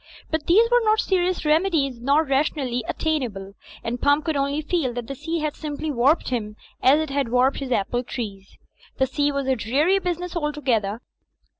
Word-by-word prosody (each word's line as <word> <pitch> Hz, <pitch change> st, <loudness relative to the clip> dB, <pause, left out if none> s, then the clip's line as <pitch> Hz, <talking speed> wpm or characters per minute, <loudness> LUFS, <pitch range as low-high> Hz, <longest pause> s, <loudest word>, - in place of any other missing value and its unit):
But 315 Hz, -1 st, -2 dB
these 435 Hz, +7 st, +5 dB
were 485 Hz, 0 st, +5 dB
not 435 Hz, 0 st, +3 dB
serious 365 Hz, -4 st, 0 dB
remedies 300 Hz, -5 st, +2 dB
nor 280 Hz, +5 st, +3 dB
ra 275 Hz, -2 st, +2 dB
tionally 260 Hz, -5 st, -2 dB
attainable; 235 Hz, -12 st, -2 dB, 0.3 s
and 240 Hz, +1 st, -3 dB
Pump 285 Hz, +2 st, +3 dB
could 320 Hz, -2 st, 0 dB
only 280 Hz, +2 st, 0 dB
feel 300 Hz, -6 st, -1 dB
that 240 Hz, -1 st, -4 dB
the 275 Hz, -, -5 dB
sea 325 Hz, +4 st, -3 dB
had 305 Hz, -1 st, -2 dB
simply 305 Hz, 0 st, -4 dB
warped 275 Hz, +5 st, +2 dB
him 215 Hz, -4 st, -3 dB, 0.3 s
as 270 Hz, +4 st, +5 dB
it 315 Hz, -3 st, -3 dB
had 275 Hz, -3 st, 0 dB
warped 250 Hz, +3 st, +2 dB
his 270 Hz, -2 st, -5 dB
apple 240 Hz, +2 st, 0 dB
trees. 200 Hz, -6 st, -7 dB, 0.4 s
The 265 Hz, -, +3 dB
sea 290 Hz, +2 st, 0 dB
was 280 Hz, -1 st, -2 dB
a 265 Hz, 0 st, +2 dB
dreary 285 Hz, -, +2 dB
business 360 Hz, -1 st, -3 dB
altogether. 260 Hz, -9 st, -1 dB
280 Hz, 185 wpm, -23 LUFS, 245-315 Hz, 0.4 s, these